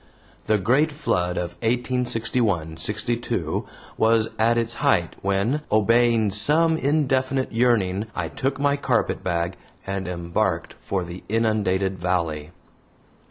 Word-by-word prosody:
The 110 - +3
great 130 - +2
flood 90 - -1
of 85 -1 -2
1861 115 -7 0
62 115 +8 -1 0.3
was 110 0 +3
at 115 +1 +3
its 115 0 0
height - - +2
when, 100 +9 0
obeying 115 0 +3
some 155 +11 +4
indefinite 135 -3 0
yearning, 115 -4 +1
I - - -2
took 135 +1 -3
my 145 0 +2
carpetbag 95 -9 -1 0.3
and 95 -1 -4
embarked 85 0 -2
for 95 -2 -2
the 85 +1 -9
inundated 100 -4 0
valley. 85 -4 -1
110 Hz, 115 wpm, -23 LUFS, 95-125 Hz, 0.3 s, some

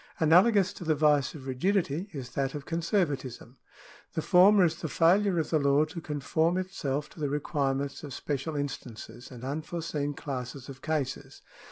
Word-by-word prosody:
Analogous 185 +5 +5
to - - -9
the 160 -2 +1
vice 150 -2 +2
of 135 -4 -10
rigidity 170 +5 0
is 135 -6 -7
that 135 0 -2
of 145 -1 -6
conservatism. 145 - -2 0.6
The 160 - -2
former 190 +1 +6
is 165 - 0
the 160 - -2
failure 180 - +3
of 160 - -1
the 155 - +3
law 140 +1 +3
to 165 +2 -8
conform 160 +3 0
itself 150 -6 -3
to - - -15
the 145 -2 -1
requirements 140 -1 -2
of 145 - -7
special 145 +4 -3
instances 120 -4 -6
and 125 -2 -11
unforeseen 150 0 -3
classes 130 -2 -6
of 135 -1 -10
cases. 150 -5 -3
150 Hz, 165 wpm, -29 LUFS, 135-170 Hz, 0.6 s, former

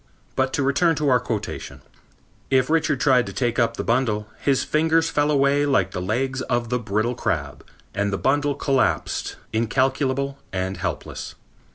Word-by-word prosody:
But 130 0 +1
to 145 - +1
return 155 +5 +3
to 150 -1 0
our 125 -2 +5
quotation: - - -5 0.7
"If 130 +1 +2
Richard 155 -4 +2
tried 130 -3 +3
to - - -6
take 120 -2 0
up 115 -1 +1
the - - -2
bundle, 115 -3 0 0.2
his 135 -2 +2
fingers 160 +1 +2
fell 145 0 +2
away 140 0 +3
like 95 -10 +2
the 90 - -4
legs 130 +7 -1
of 120 -2 -1
the 125 0 0
brittle 110 +2 -1
crab 70 - -3 0.3
and 100 0 0
the 100 - -1
bundle 145 +3 +1
collapsed, 135 -1 0 0.2
incalculable 135 +4 0
and 95 0 -2
helpless. 85 - -5
130 Hz, 165 wpm, -23 LUFS, 115-140 Hz, 0.7 s, our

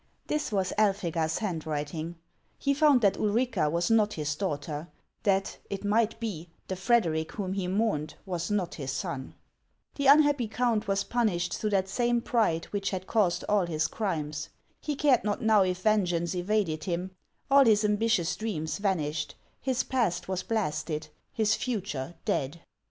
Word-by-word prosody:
This 300 -5 -2
was 190 -3 0
Elphega's 170 -6 +1
handwriting. 160 -3 -3 0.4
He 280 - +1
found 290 -3 +5
that 200 -3 +3
Ulrica 215 -6 +1
was 170 +5 0
not 215 -2 +4
his 150 -1 -2
daughter; 150 -2 -3 0.3
that, 195 -1 0
it 200 +1 -4
might 225 +2 +2
be, 180 -8 -5 0.2
the 190 - -2
Frederic 180 -6 +1
whom 190 -3 -3
he 195 -2 -2
mourned 185 -6 0
was 175 -3 -3
not 205 -4 -1
his 135 -4 -4
son. 130 0 -4 0.6
The 280 -1 0
un 290 +3 +8
happy 285 -5 +1
count 225 -1 0
was 195 0 +1
punished 210 -8 0
through 215 - -1
that 195 -2 +1
same 240 +4 +1
pride 220 -9 +1
which 200 -1 -1
had 185 -1 -4
caused 195 -6 +1
all 205 -4 +2
his 160 -1 0
crimes. 155 -9 -3 0.3
He 295 - -3
cared 275 -3 +3
not 210 +4 -1
now 220 -2 +5
if 185 -1 0
vengeance 180 -6 +2
evaded 180 -3 0
him; 180 +1 -2 0.4
all 275 0 +7
his 215 -2 +4
ambitious 210 -4 +2
dreams 160 -7 -3
van 195 -2 +2
ished, 150 0 -3
— - - -40
his 260 -2 0
past 225 -10 0
was 185 -1 -1
blasted, 155 -7 -2 0.2
his 220 -1 +2
future 180 - -3
dead. 140 +5 -1
195 Hz, 165 wpm, -28 LUFS, 165-220 Hz, 0.6 s, un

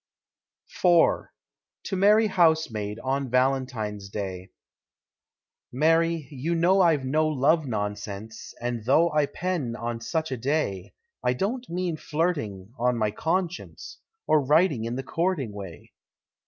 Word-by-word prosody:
IV. 175 -2 +4 0.6
TO 195 - -3
MARY 210 +4 +5
HOUSEMAID, 160 - +1
ON 135 0 -1
VALENTINE'S 125 -6 -1
DAY. 95 -2 -5 1.2
Mary, 165 +2 +2
you 150 +5 -2
know 180 +4 +4
I've 160 -7 +3
no 155 +4 +2
love 155 +1 +2
nonsense, 105 0 -5
And 120 -2 -3
though 165 +7 +4
I 150 -1 +2
pen 165 -11 -3
on 115 -1 -4
such 160 +4 -2
a 130 - -2
day, 115 - -2 0.3
I 125 - +2
don't 235 - -3
mean 175 -1 -2
flirting, 145 - -2
on 125 0 +1
my 110 -2 +1
conscience, 175 - -3 0.3
Or 155 -2 +3
writing 150 -4 +3
in 115 +1 -3
the 135 - -4
courting 165 - -1
way. 95 -5 -10
135 Hz, 125 wpm, -26 LUFS, 115-165 Hz, 1.2 s, MARY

